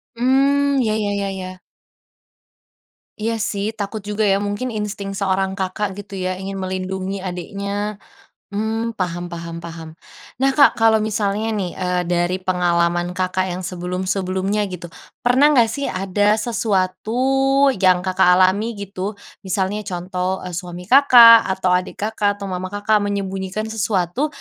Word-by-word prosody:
Mmm, 275 Hz, +3 st, +2 dB
ya 215 Hz, -3 st, 0 dB
ya 210 Hz, -2 st, -1 dB
ya 200 Hz, -1 st, -2 dB
ya. 185 Hz, -1 st, -7 dB, 1.6 s
Iya 225 Hz, +1 st, -1 dB
sih 205 Hz, 0 st, -2 dB
takut 205 Hz, +1 st, -4 dB
juga 210 Hz, +1 st, -1 dB
ya 195 Hz, +1 st, +2 dB
mungkin 205 Hz, +5 st, -3 dB
insting 210 Hz, -3 st, -4 dB
seorang 190 Hz, -1 st, 0 dB
Kakak 195 Hz, +1 st, -3 dB
gitu 195 Hz, -1 st, -8 dB
ya 185 Hz, 0 st, -2 dB
ingin 195 Hz, +1 st, -6 dB
melindungi 190 Hz, +1 st, -4 dB
adiknya, 200 Hz, +3 st, -4 dB, 0.6 s
mmm, 220 Hz, +2 st, -2 dB
paham 175 Hz, -1 st, -3 dB
paham 170 Hz, 0 st, -6 dB
paham. 165 Hz, -1 st, -8 dB, 0.5 s
Nah 270 Hz, +1 st, +2 dB
Kak 280 Hz, +1 st, +5 dB
kalau 225 Hz, -1 st, +4 dB
misalnya 215 Hz, 0 st, -1 dB
nih, 190 Hz, -4 st, -2 dB
eee, 180 Hz, -1 st, -1 dB
dari 175 Hz, +1 st, +1 dB
pengalaman 175 Hz, -1 st, +1 dB
Kakak 185 Hz, 0 st, -1 dB
yang 180 Hz, 0 st, -4 dB
sebelum-sebelumnya 185 Hz, +3 st, -2 dB
gitu, 180 Hz, -2 st, -8 dB, 0.3 s
pernah 255 Hz, +4 st, +5 dB
enggak 240 Hz, -7 st, +4 dB
sih 280 Hz, +4 st, -3 dB
ada 200 Hz, +2 st, +1 dB
sesuatu 240 Hz, +6 st, +1 dB
yang 185 Hz, -5 st, +2 dB
Kakak 185 Hz, -1 st, +4 dB
alami 200 Hz, +5 st, +2 dB
gitu 200 Hz, 0 st, -5 dB, 0.3 s
misalnya 190 Hz, +2 st, -1 dB
contoh, 185 Hz, +1 st, -3 dB
eee, 180 Hz, -, -6 dB
suami 175 Hz, 0 st, -6 dB
Kakak 235 Hz, -1 st, +8 dB
atau 185 Hz, -1 st, 0 dB
adik 180 Hz, +2 st, -1 dB
Kakak 210 Hz, -1 st, 0 dB
atau 200 Hz, -1 st, -6 dB
mama 185 Hz, 0 st, -3 dB
Kakak 205 Hz, +2 st, +1 dB
menyembunyikan 195 Hz, 0 st, -3 dB
sesuatu 210 Hz, -, 0 dB
195 Hz, 140 wpm, -20 LUFS, 185-215 Hz, 1.6 s, Kakak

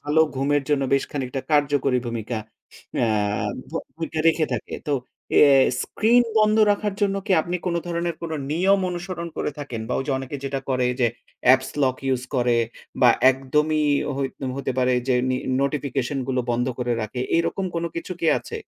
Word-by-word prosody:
ভালো 150 Hz, +2 st, +2 dB, 0.2 s
ঘুমের 140 Hz, +1 st, +1 dB
জন্য 145 Hz, -2 st, +2 dB
বেশ 140 Hz, -, +3 dB
খানিকটা 135 Hz, -2 st, -3 dB
কার্যকরী 145 Hz, -3 st, +2 dB
ভূমিকা 115 Hz, 0 st, -3 dB, 0.7 s
আ -, -, +2 dB, 0.6 s
ভ -, -, -18 dB, 0.2 s
ভূমিকা 160 Hz, -1 st, -4 dB
রেখে 160 Hz, -1 st, +2 dB
থাকে। -, -, -4 dB
তো 145 Hz, -, 0 dB, 0.5 s
এ -, -, +8 dB, 0.4 s
স্ক্রিন 240 Hz, +3 st, +3 dB, 0.2 s
বন্ধ 215 Hz, 0 st, +4 dB
রাখার 205 Hz, 0 st, 0 dB
জন্য 200 Hz, -1 st, +2 dB
কি 200 Hz, -, +2 dB
আপনি 175 Hz, +1 st, -2 dB
কোন 170 Hz, -, 0 dB
ধরনের 170 Hz, 0 st, -2 dB, 0.4 s
নিয়ম 190 Hz, +5 st, +3 dB
কোন 185 Hz, -, 0 dB
অনুসরণ 175 Hz, -1 st, -5 dB
করে -, -, -1 dB
থাকেন? 125 Hz, -6 st, -5 dB
বা -, -, -2 dB
ওইযে 135 Hz, +1 st, -2 dB
অনেকে 135 Hz, +2 st, -5 dB
যেটা 135 Hz, 0 st, -2 dB
করে 125 Hz, -1 st, +2 dB
যে, 120 Hz, -, +5 dB, 0.4 s
অ্যাপ্স 130 Hz, +1 st, +5 dB
লক 130 Hz, -1 st, +2 dB
ইউজ 130 Hz, -2 st, 0 dB
করে 120 Hz, -1 st, +2 dB, 0.4 s
বা 125 Hz, -, +7 dB, 0.2 s
একদমই 150 Hz, +4 st, 0 dB, 0.3 s
হই 140 Hz, -, 0 dB, 0.3 s
হতে 135 Hz, -1 st, -2 dB
পারে 130 Hz, 0 st, +3 dB, 0.2 s
যে 130 Hz, -, +4 dB, 0.2 s
নি -, -, +1 dB, 0.3 s
নোটিফিকেশন 140 Hz, -1 st, -1 dB
গুলো 130 Hz, -1 st, +1 dB
বন্ধ 120 Hz, +1 st, 0 dB
করে 120 Hz, -1 st, 0 dB
রাখে। 110 Hz, +3 st, -4 dB, 0.2 s
এরকম 180 Hz, +3 st, 0 dB
কোন 170 Hz, 0 st, -1 dB
কিছু 175 Hz, +2 st, -4 dB
কি -, -, +2 dB
আছে? 455 Hz, -, -7 dB
145 Hz, 175 wpm, -23 LUFS, 130-170 Hz, 0.7 s, এ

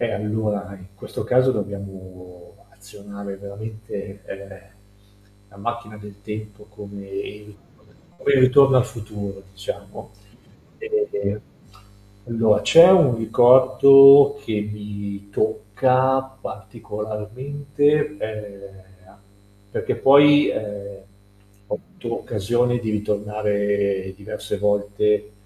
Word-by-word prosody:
Eh, 120 Hz, -2 st, -1 dB
allora, 105 Hz, -1 st, -3 dB
in 95 Hz, +1 st, -15 dB
questo 100 Hz, -, -7 dB
caso 130 Hz, +3 st, +3 dB
dobbiamo 95 Hz, -2 st, -9 dB
azionare 100 Hz, 0 st, -11 dB
veramente, 100 Hz, -1 st, -9 dB
ehm, 100 Hz, 0 st, -10 dB, 0.9 s
la 100 Hz, -, -19 dB
macchina 110 Hz, 0 st, -6 dB
del 105 Hz, -1 st, -12 dB
tempo 105 Hz, -1 st, -9 dB
come 100 Hz, -1 st, -11 dB
il 105 Hz, +1 st, -8 dB, 0.6 s
quel 140 Hz, -5 st, +2 dB
Ritorno 130 Hz, +1 st, +5 dB
al 125 Hz, -, +2 dB
futuro 105 Hz, -4 st, -8 dB
diciamo, 100 Hz, +2 st, -9 dB, 0.7 s
e 425 Hz, -, -3 dB, 0.8 s
allora, 115 Hz, -2 st, +1 dB
c'è 170 Hz, +2 st, +7 dB
un 145 Hz, -11 st, +5 dB
ricordo 135 Hz, +4 st, +7 dB
che 105 Hz, -2 st, -2 dB
mi 100 Hz, -1 st, -8 dB
tocca 120 Hz, +6 st, +1 dB, 0.2 s
particolarmente, 140 Hz, +8 st, -3 dB
ehm, 100 Hz, -4 st, -9 dB, 0.9 s
perché -, -, -3 dB
poi, 145 Hz, +2 st, +6 dB
ehm, 100 Hz, -2 st, -6 dB, 0.7 s
ho -, -, -3 dB, 0.2 s
avuto -, -, -5 dB
occasione 120 Hz, +4 st, -1 dB
di 110 Hz, -2 st, -4 dB
ritornare 105 Hz, -2 st, -2 dB
diverse 100 Hz, +1 st, -6 dB
volte, 105 Hz, +1 st, 0 dB
105 Hz, 95 wpm, -21 LUFS, 100-120 Hz, 0.9 s, c'è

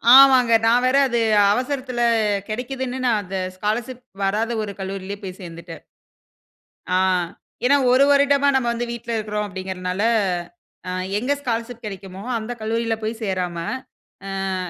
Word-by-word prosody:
ஆமாங்க, 260 Hz, -3 st, +7 dB
நான் 240 Hz, +2 st, +4 dB
வேற 255 Hz, +2 st, +3 dB
அது 240 Hz, -1 st, 0 dB, 0.3 s
அவசரத்தில 255 Hz, 0 st, -2 dB, 0.5 s
கெடைக்குதுன்னு, 255 Hz, +3 st, -4 dB
நான் 220 Hz, -3 st, +3 dB
அந்த 190 Hz, +1 st, -5 dB, 0.2 s
ஸ்காலர்ஷிப் 240 Hz, +5 st, -3 dB, 0.2 s
வராத 220 Hz, +4 st, 0 dB
ஒரு 205 Hz, -, -5 dB
கல்லூரியிலேயே 195 Hz, +1 st, -5 dB
போய் 185 Hz, 0 st, -7 dB
சேர்ந்துட்டேன். 170 Hz, -1 st, -9 dB, 1.1 s
ஆ -, -, +3 dB, 0.7 s
ஏன்னா, 280 Hz, +3 st, +5 dB, 0.2 s
"ஒரு 260 Hz, +2 st, +6 dB
வருடமா 280 Hz, 0 st, +4 dB
நம்ம 250 Hz, -2 st, +1 dB
வந்து 240 Hz, +1 st, -2 dB
வீட்ல 235 Hz, 0 st, -6 dB
இருக்கிறோம்." 210 Hz, -1 st, -2 dB
அப்படீங்கிறனால 185 Hz, 0 st, -4 dB, 0.9 s
அ -, -, -2 dB, 0.3 s
எங்க 255 Hz, +6 st, 0 dB
ஸ்காலர்ஷிப் 235 Hz, -2 st, -4 dB
கெடைக்குமோ, 195 Hz, -2 st, -7 dB, 0.2 s
அந்த 220 Hz, +2 st, -5 dB
கல்லூரியில 225 Hz, +1 st, -1 dB
போய் 220 Hz, +1 st, -1 dB
சேராம, 185 Hz, -4 st, -2 dB, 1.0 s
"அ -, -, -1 dB
225 Hz, 130 wpm, -22 LUFS, 195-250 Hz, 1.1 s, ஆமாங்க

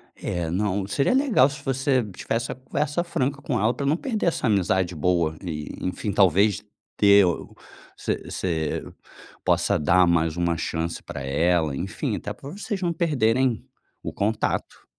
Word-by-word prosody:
É, 85 Hz, -2 st, -3 dB
não, 100 Hz, +1 st, 0 dB
seria 135 Hz, -, +1 dB
legal 255 Hz, -, +4 dB
se 145 Hz, -, -9 dB
você 135 Hz, -1 st, +1 dB
tivesse 115 Hz, +5 st, -2 dB
uma -, -, -5 dB
conversa 145 Hz, +5 st, -2 dB
franca 140 Hz, -4 st, -2 dB
com 125 Hz, -5 st, -1 dB
ela 110 Hz, +3 st, +2 dB
pra 140 Hz, -, -4 dB
não 145 Hz, +3 st, +3 dB
perder 220 Hz, -6 st, -2 dB
essa 165 Hz, -7 st, 0 dB
amizade 95 Hz, -3 st, +1 dB
boa 85 Hz, -1 st, +1 dB
e, 75 Hz, -4 st, -5 dB
enfim, 95 Hz, +3 st, -2 dB
talvez 100 Hz, +1 st, +3 dB, 0.4 s
ter 100 Hz, -1 st, +6 dB
o 85 Hz, -, -3 dB, 0.4 s
você -, -, -1 dB
você 80 Hz, -4 st, -2 dB, 0.6 s
possa -, -, +2 dB
dar 85 Hz, +4 st, +4 dB
mais 80 Hz, -1 st, +1 dB
uma 85 Hz, -1 st, +1 dB
chance 80 Hz, +1 st, -3 dB
pra 70 Hz, -, -7 dB
ela, 80 Hz, +2 st, +1 dB
enfim, 95 Hz, +7 st, -3 dB
até -, -, -5 dB
pra 140 Hz, -, -10 dB
vocês 200 Hz, +1 st, -4 dB
não 175 Hz, -2 st, 0 dB
perderem 130 Hz, -, +1 dB, 0.4 s
o -, -, -4 dB
contato. 105 Hz, +2 st, -2 dB
100 Hz, 160 wpm, -24 LUFS, 85-135 Hz, 0.6 s, ter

